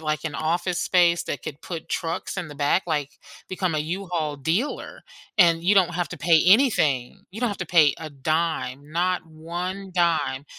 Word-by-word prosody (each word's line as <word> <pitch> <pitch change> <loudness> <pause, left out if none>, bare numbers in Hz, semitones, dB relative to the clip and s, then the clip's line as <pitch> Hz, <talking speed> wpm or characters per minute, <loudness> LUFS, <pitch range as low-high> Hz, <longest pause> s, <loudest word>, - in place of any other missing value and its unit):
like, 155 0 -2
an 155 - -3
office 175 +4 -1
space 175 -2 +3
that 145 - -4
could 145 +1 -8
put 165 -3 -7
trucks 165 +2 -3
in 180 -4 -4
the 145 - -10
back, 145 +6 +2
like, 150 -4 -2 0.4
become 185 -2 -1
a 155 - 0
U-Haul 165 -1 -3
dealer 170 - -2 0.4
and 170 -2 +5
you 185 +4 +3
don't 185 -3 +3
have 175 0 -1
to - - -8
pay 165 -2 +4
anything, 165 - +3
you 205 - -9
don't 245 - +1
have 205 - -4
to 185 - -3
pay 155 -4 +5
a 160 -1 -6
dime, 145 -1 -2
not 180 +3 0
1 175 +4 -6
dime, 165 -6 +1
170 Hz, 185 wpm, -24 LUFS, 155-180 Hz, 0.4 s, and